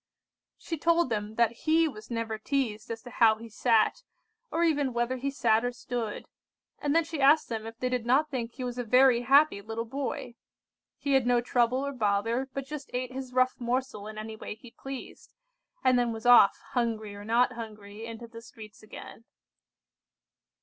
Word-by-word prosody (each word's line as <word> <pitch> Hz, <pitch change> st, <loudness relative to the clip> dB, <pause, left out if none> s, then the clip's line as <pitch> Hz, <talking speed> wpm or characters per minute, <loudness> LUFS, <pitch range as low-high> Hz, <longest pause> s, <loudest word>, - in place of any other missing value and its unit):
She 330 Hz, -3 st, -5 dB
told 335 Hz, -4 st, +2 dB
them 210 Hz, 0 st, -3 dB
that 235 Hz, -1 st, +3 dB
he 320 Hz, +1 st, +4 dB
was 215 Hz, -7 st, -9 dB
never 230 Hz, -2 st, -3 dB
teazed 225 Hz, -4 st, -2 dB
as 230 Hz, -1 st, -5 dB
to 245 Hz, -, -10 dB
how 225 Hz, -3 st, +5 dB
he 230 Hz, +1 st, -10 dB
sat, 225 Hz, -, +2 dB, 0.5 s
or 335 Hz, -, 0 dB
even 290 Hz, -6 st, +1 dB
whether 240 Hz, +2 st, -1 dB
he 275 Hz, +2 st, -2 dB
sat 230 Hz, -4 st, +2 dB
or 245 Hz, -, 0 dB
stood, 240 Hz, -3 st, -5 dB, 0.5 s
and 290 Hz, +1 st, 0 dB
then 330 Hz, -, +5 dB
she 320 Hz, -2 st, -5 dB
asked 290 Hz, +3 st, +5 dB
them 225 Hz, -1 st, -4 dB
if 225 Hz, 0 st, -9 dB
they 255 Hz, -, -1 dB
did 250 Hz, -2 st, -1 dB
not 270 Hz, +6 st, +2 dB
think 240 Hz, -3 st, -3 dB
he 260 Hz, -, -6 dB
was 245 Hz, 0 st, -4 dB
a -, -, -1 dB
very 250 Hz, +1 st, +5 dB
happy 275 Hz, -3 st, +4 dB
little 225 Hz, +2 st, -4 dB
boy? 255 Hz, -1 st, -4 dB, 0.6 s
He 280 Hz, -, -1 dB
had 265 Hz, -3 st, +3 dB
no 245 Hz, -1 st, +4 dB
trouble 245 Hz, +2 st, +1 dB
or 280 Hz, -, -3 dB
bother, 225 Hz, +3 st, 0 dB
but 275 Hz, 0 st, -5 dB
just 290 Hz, 0 st, -7 dB
ate 255 Hz, 0 st, -2 dB
his 260 Hz, -1 st, -6 dB
rough 255 Hz, +1 st, +2 dB
morsel 240 Hz, -3 st, -2 dB
in 215 Hz, 0 st, -8 dB
any 220 Hz, +1 st, -6 dB
way 215 Hz, -, -7 dB
he 230 Hz, +2 st, -15 dB
pleased, 270 Hz, +1 st, -9 dB, 0.5 s
and 255 Hz, -1 st, +4 dB
then 240 Hz, -1 st, +1 dB
was 225 Hz, 0 st, -7 dB
off, 245 Hz, -5 st, +7 dB
hungry 225 Hz, -4 st, -1 dB
or 205 Hz, 0 st, -9 dB
not 240 Hz, +3 st, +2 dB
hungry, 215 Hz, -2 st, -8 dB
into 230 Hz, +1 st, -8 dB
the 230 Hz, 0 st, -11 dB
streets 215 Hz, -2 st, -13 dB
again. 220 Hz, +1 st, -11 dB
240 Hz, 190 wpm, -28 LUFS, 225-265 Hz, 0.6 s, off